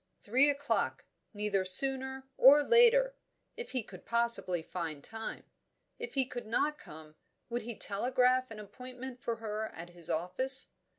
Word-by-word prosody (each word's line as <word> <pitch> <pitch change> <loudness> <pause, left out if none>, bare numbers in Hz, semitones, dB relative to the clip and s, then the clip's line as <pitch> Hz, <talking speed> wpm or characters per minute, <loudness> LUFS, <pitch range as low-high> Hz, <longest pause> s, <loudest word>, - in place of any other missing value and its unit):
Three 260 +7 +3
o'clock; 285 0 -2 0.3
neither 205 -2 -1
sooner 265 +7 +4
or 285 +3 +7
later; 485 +4 +4 0.4
if 475 - -8
he 255 -3 -2
could 185 -3 -13
possibly 235 -7 -1
find 160 -5 -6
time. 225 0 -7 0.6
If 470 -8 -7
he 265 -1 +2
could 245 -3 -8
not 300 +7 -1
come, 155 0 -13 0.4
would 240 0 -3
he 235 0 -7
telegraph 255 +4 +1
an 220 -1 -10
appointment 250 +4 -10
for 235 - -3
her 220 -1 -5
at 175 -2 -11
his 175 -2 -5
office? 185 +11 +2
240 Hz, 150 wpm, -31 LUFS, 200-265 Hz, 0.6 s, or